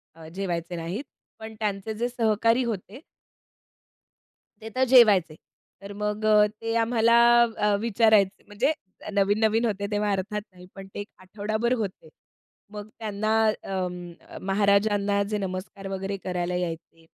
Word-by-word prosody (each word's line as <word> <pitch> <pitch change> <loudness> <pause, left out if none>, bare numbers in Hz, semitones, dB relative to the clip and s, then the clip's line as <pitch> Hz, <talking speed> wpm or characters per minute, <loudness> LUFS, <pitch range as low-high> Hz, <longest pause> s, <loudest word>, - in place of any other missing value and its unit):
अ, 160 -1 -12
जेवायचे 175 -2 -3
नाहीत. 175 - -4 0.4
पण 220 0 -8
त्यांचे 210 0 -2
जे 235 +3 -2
सहकारी 230 +1 +2
होते 220 0 -5 1.6
ते 220 - -7
तर 260 - +2
जेवायचे. 205 -10 +5 0.5
तर 200 +1 -8
मग 210 +1 -2
अ, 210 -1 +6 0.2
ते 225 0 -2
आम्हाला 230 0 +3 0.4
अ, 210 0 +2
विचारायचे. 215 -3 +3
म्हणजे 235 +9 0 0.4
नवीन-नवीन 215 +3 +2
होते 200 -2 -2
तेव्हा 205 0 0
अर्थात 200 +2 -2
नाही 180 0 -15
पण 195 -1 -9
ते - - -6
1 205 - -6
आठवडाभर 215 +5 -2
होते. 190 -7 -5 0.6
मग 210 0 -7
त्यांना 215 0 -2 0.3
अं, 180 -2 -4
अ, - - -10
महाराजांना 200 0 +2
जे 210 - 0
नमस्कार 195 +1 -5
वगैरे 195 +1 -4
करायला 180 -1 -2
यायचे 165 -2 -5
205 Hz, 135 wpm, -25 LUFS, 190-220 Hz, 1.6 s, अ